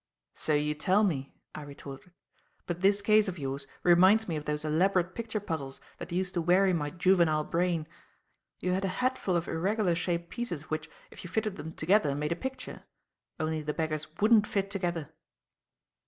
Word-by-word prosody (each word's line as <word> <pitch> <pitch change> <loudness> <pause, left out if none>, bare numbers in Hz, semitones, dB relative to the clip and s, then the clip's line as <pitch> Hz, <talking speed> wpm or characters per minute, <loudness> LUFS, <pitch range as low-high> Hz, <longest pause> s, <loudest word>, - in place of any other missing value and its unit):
"So 155 - 0
you 150 +1 +1
tell 185 +7 +2
me," 140 -9 -1 0.2
I - - -7
retorted; 140 +2 -10 0.5
"but 175 0 -4
this 200 +1 +3
case 215 0 +4
of 185 -1 -4
yours 135 -1 -4 0.2
reminds 185 +5 +5
me 165 - -2
of 150 -1 -4
those 150 0 -2
elaborate 180 +3 +2
picture 225 0 -3
puzzles 160 -9 -4 0.2
that - - -7
used 180 +1 0
to 175 - 0
weary 185 +3 +4
my 150 -4 -1
juvenile 170 -3 +3
brain. 170 -1 0 0.8
You 180 - 0
had 190 +2 0
a - - +1 0.2
hatful 255 -8 0
of 170 -1 0
irregular 190 +2 +1
shaped 170 0 -2
pieces 175 -12 -5
which, 155 - -3 0.2
if - - -11
you 180 - -8
fitted 215 +1 -1
them 160 0 -7
together, 160 -4 +2
made 150 +2 -2
a - - +1
picture. 265 +7 -6 0.6
Only 155 0 -1
the 150 0 -3
beggars 155 -1 -2
wouldn't 215 0 +5
fit 195 -1 -1
together." 175 -6 -3
175 Hz, 180 wpm, -29 LUFS, 155-195 Hz, 0.8 s, reminds